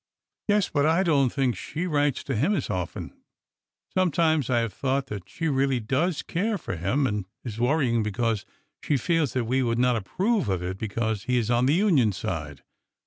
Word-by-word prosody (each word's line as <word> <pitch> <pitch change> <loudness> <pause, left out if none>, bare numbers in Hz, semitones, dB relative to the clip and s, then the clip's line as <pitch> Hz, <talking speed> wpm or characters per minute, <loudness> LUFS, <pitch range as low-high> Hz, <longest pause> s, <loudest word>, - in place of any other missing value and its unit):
Yes, 205 -2 +3
but 145 -1 +1
I 165 +4 +3
don't 140 -7 +3
think 130 -3 0
she 160 - -4
writes 145 -5 +1
to 135 - -2
him 155 - +2
as 140 - -2
often. 90 -3 -4 0.8
Sometimes 160 -6 +2
I 120 -2 +3
have 115 -2 -3
thought 135 0 -1
that 95 -2 -7
she 165 - -3
really 135 -3 +1
does 145 +9 0
care 205 +5 -1
for 150 - -5
him 100 - 0
and 105 -5 -2 0.2
is 115 -3 -6
worrying 125 -2 +2
because 110 0 -1 0.4
she 145 - +1
feels 155 -1 +1
that 125 -2 0
we 130 +3 +1
would 115 -2 0
not 125 0 +3
approve 185 - 0
of 90 -2 -1
it 95 +2 -4
because 110 -1 -2
he 125 0 +1
is 120 -1 0
on 120 +1 +3
the 145 - +4
Union 160 - +3
side. 75 -6 -5
130 Hz, 195 wpm, -26 LUFS, 110-155 Hz, 0.8 s, the